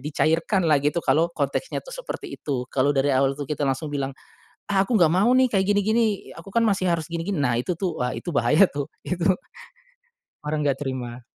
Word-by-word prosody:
dicairkan 165 +5 +1
lah 150 - +5
gitu, 145 +4 0
kalau 165 +2 +3
konteknya 145 - -2
tuh - - -10
seperti 415 -7 -7
itu, 130 -4 -3
kalo 140 +2 +2
dari 135 +1 +2
awal 135 +1 +3
tuh 145 -2 -6
kita 150 -1 -1
langsung 135 +3 -1
bilang 140 -2 -3 0.6
"Ah, 195 -1 +3
aku 230 +4 -1
ga 170 - +6
mau 190 +6 +3
nih, 260 0 +5
kayak 195 -2 +2
gini-gini. 210 +1 +1
Aku - - -12
kan 230 +3 +2
masih 190 -3 +1
harus 165 -3 -1
gini-gini." 170 +2 -3
Nah, 125 -4 +1
itu 125 +9 -1 0.2
wah, 125 0 -1
itu 175 - -6
bahaya 155 +6 +5
tuh, 145 -1 -5 0.2
itu 180 -1 -2 1.2
orang 150 0 -2
enggak 140 0 0
terima. 125 -3 -4
155 Hz, 195 wpm, -24 LUFS, 140-195 Hz, 1.2 s, ga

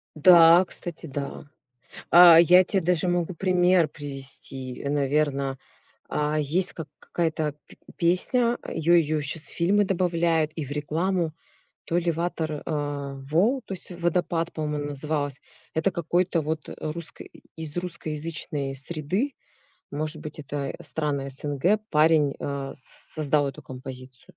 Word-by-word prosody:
Да, 170 +2 +8
кстати, 170 -2 -6
да. 140 +1 -5 0.7
А, 175 -1 +9
я 180 +2 +7
те 195 +1 0
даже 180 +1 +1
могу 175 0 0
пример 180 -2 +3
привести, 135 -3 -5
наверно, 140 -1 0 0.5
а, 150 +1 0
есть 175 +6 +1
как 160 -3 -7
какая-то 160 -3 -2
п - - -16 0.2
песня, 235 +8 +2
её 165 +2 +2
её 155 -2 +3
щас 150 +2 -4
в - - -9
фильмы 200 +4 +3
добавляют 170 -4 +1
и 155 - -3
в 140 - -10
рекламу, 160 +3 -1 0.5
то 170 - 0
ли 175 -1 +1
Ватер 160 -2 -3
э 145 -3 -3 0.2
вол, 225 - +3
то 195 - -5
есть 185 - -8
"Водопад" 175 -1 -1
по-моему 150 -1 -2
она 145 - -3
называлась. 145 -1 -3 0.3
Это 160 +4 +1
какой-то 170 0 0
вот, 155 0 -3
э, - - -8
русской 155 +1 -7 0.3
из 160 0 -6
русскоязычной 160 -4 -4
среды, 170 - -2 0.6
может 155 +2 -3
быть 155 -1 -8
это 140 -1 -4
страны 145 -3 -2
СНГ, 145 +9 +1
парень, 150 -2 +4
э, 140 -1 -4
с 130 - -5
создал 150 -2 +1
эту 135 - -9
композицию. 130 0 -9
155 Hz, 140 wpm, -25 LUFS, 145-175 Hz, 0.7 s, А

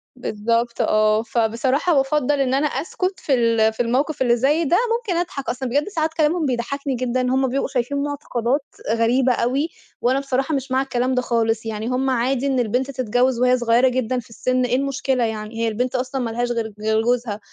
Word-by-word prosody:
بالضبط 230 0 -1
آه، 215 0 +3
فبصراحة 235 +8 +1
بافضّل 285 0 +1
إن 260 -1 +1
أنا 280 +3 +2
أسكت 365 +5 -2
في 280 - -1
ال 230 -3 +3
في - - -20
الموقف 265 +6 -1
اللي 240 -2 +4
زي 285 +7 +2
ده، 335 +3 +3 0.2
ممكن 425 -8 -3
أضحك 290 -6 -4
أصل 255 0 -3
بجد 290 +4 0
ساعات 320 -4 -1
كلامهم 320 +1 +1
بيضحّكني 270 +2 -2
جدًا، 255 +1 -1
هُم 260 +1 +1
بيبقوا 270 +2 -1
شايفين 255 +2 -2
مُعتقدات 275 -2 -2 0.3
غريبة 245 +3 +2
أوي، 265 +7 0 0.3
وأنا 255 +3 +2
بصراحة 275 +2 -1
مش 270 -1 -4
مع 260 +1 +2
الكلام 255 -1 -1
ده 250 - +2
خالص، 225 -2 0
يعني 220 0 -4
هُم 255 +2 0
عادي 260 +2 0
إن 265 -2 +1
البنت 250 +4 0
تتجوّز 250 0 +1
وهي 250 0 +4
صغيّرة 240 +1 +3
جدًا 255 -1 0
في 240 - -12
السن، 255 +2 0
إيه 245 0 +1
المشكلة 270 -1 0
يعني! 220 0 -4
هي - - +2
البنت 245 +4 -2
أصلًا 260 +1 -2
ما 235 - -2
لهاش 240 +2 -2
غير 230 -2 -1
ج 215 - -13
غير 220 0 +2
جوزها، 235 -3 -1
255 Hz, 200 wpm, -21 LUFS, 235-275 Hz, 0.3 s, اللي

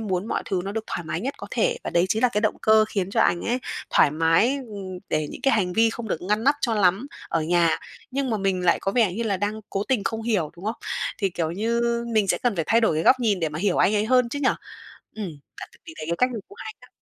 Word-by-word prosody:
muốn 195 -2 -2
mọi - - -1
thứ 185 -2 -1
nó 200 - -4
được 225 0 -3
thoải 175 - -4
mái - - -3
nhất 270 +4 -3
có - - -7
thể - - +1
và - - -3
đấy 175 +2 +2
chính 220 +4 0
là 250 - +5
cái 210 -3 -1
động 215 - 0
cơ 220 0 +5
khiến 195 -2 -2
cho - - +1
anh 175 - +3
ấy 245 +2 0 0.3
thoải 145 - +5
mái, 165 - +2
ừm, 190 -3 -7
để 155 -1 0
những - - -9
cái 270 - +3
hành 180 -4 0
vi 225 +2 +3
không 230 -1 -6
được 165 - -3
ngăn 210 +5 0
nắp 280 +1 +5
cho 230 -3 0
lắm 200 +5 +2 0.2
ở 165 - 0
nhà. 170 0 +2 0.3
Nhưng 270 -1 -1
mà 220 - +1
mình 190 -2 -1
lại 170 - +4
có 195 - -1
vẻ 220 -7 +3
như 235 - -2
là 205 -4 0
đang 205 +3 -2
cố 195 - -1
tình 245 -7 +1
không 225 -1 -2
hiểu, 200 -10 0
đúng 180 - -12
không? 220 +2 -2 0.4
Thì, 195 -4 0
kiểu 165 -2 -2
như, 225 +6 -1 0.3
mình 210 -3 +2
sẽ - - +2
cần 240 -6 0
phải 165 - 0
thay 230 +2 +4
đổi 190 -9 +2
cái 160 - 0
góc 255 +6 +5
nhìn 205 -6 +1
để 160 - +1
mà 155 +1 -6
hiểu 190 -1 +1
anh 210 - +3
ấy 210 +1 +2
hơn 250 -1 +3
chứ 285 - -4
nhỉ? 260 - +4 0.7
Ừm, 210 -4 -4 0.3
bạn - - -7 0.2
thì 320 - -10
thấy 155 - -6
cái 170 - +1
cách 250 0 +3
này 225 - -4
cũng 405 - -15
hay 435 - -7
đó. - - -17
210 Hz, 290 wpm, -24 LUFS, 180-235 Hz, 0.7 s, là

